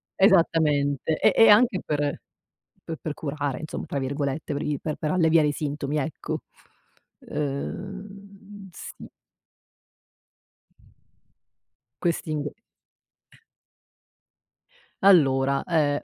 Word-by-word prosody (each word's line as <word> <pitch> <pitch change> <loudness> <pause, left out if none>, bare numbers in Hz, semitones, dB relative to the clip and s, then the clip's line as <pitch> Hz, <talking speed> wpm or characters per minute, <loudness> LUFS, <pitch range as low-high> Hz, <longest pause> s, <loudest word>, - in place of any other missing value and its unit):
Esattamente 155 -6 +3
e - - +4
e 225 -1 +7
anche 210 -2 +5
per 150 -1 -1 0.8
per 165 - -6
per 155 - -3
"curare" 145 -3 -3
insomma, 155 - -6
tra 140 - -2
virgolette 140 +2 -3
per 140 - -3
i 145 -2 -2
per 155 -2 -3
per 155 -2 -2
alleviare 165 -3 +4
i - - +1
sintomi 145 0 -3
ecco. 150 +2 -3 0.9
Uhm, 195 +6 -6
sì. - - -10 2.9
Questi 170 -2 -1
ing 150 -1 -2 2.5
Allora, 140 -7 +4
ehm 150 -4 +1
155 Hz, 95 wpm, -25 LUFS, 145-185 Hz, 2.9 s, e